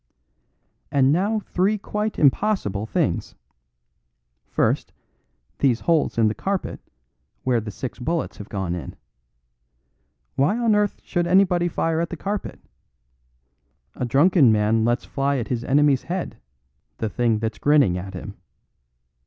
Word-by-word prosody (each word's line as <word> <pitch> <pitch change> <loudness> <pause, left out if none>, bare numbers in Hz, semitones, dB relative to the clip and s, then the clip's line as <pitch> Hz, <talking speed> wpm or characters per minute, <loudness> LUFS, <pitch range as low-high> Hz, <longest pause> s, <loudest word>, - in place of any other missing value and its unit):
"And 140 -2 +4
now 200 +7 +1
three 200 +3 0
quite 210 +1 -3
impossible 140 - +1
things. - - -1 1.1
First, - - 0 0.7
these 125 -4 +2
holes 165 -7 +1
in 115 -2 +4
the 105 - 0
carpet, 195 - -3 0.6
where 125 -3 +1
the 110 - -6
six 125 +6 -6
bullets 165 +6 -2
have 105 - -9
gone 95 -4 -3
in. 85 -6 -6 1.4
Why 165 +12 +1
on 235 -2 +2
earth 210 -1 0
should 175 -1 -1
anybody 180 -1 +3
fire 165 -1 -1
at 170 - -2
the 175 - -6
carpet? 200 +3 -4 1.3
A - - -5
drunken 140 - +4
man 110 +1 +2
lets 120 +1 0
fly 140 0 -1
at 120 - -4
his 120 -2 -2
enemy's 140 0 +3
head, 175 -9 -4 0.6
the - - -2
thing 115 0 +1
that's 110 -2 -4
grinning 140 -8 +4
at 95 +2 -6
him. 90 - -7
140 Hz, 135 wpm, -23 LUFS, 115-180 Hz, 1.4 s, And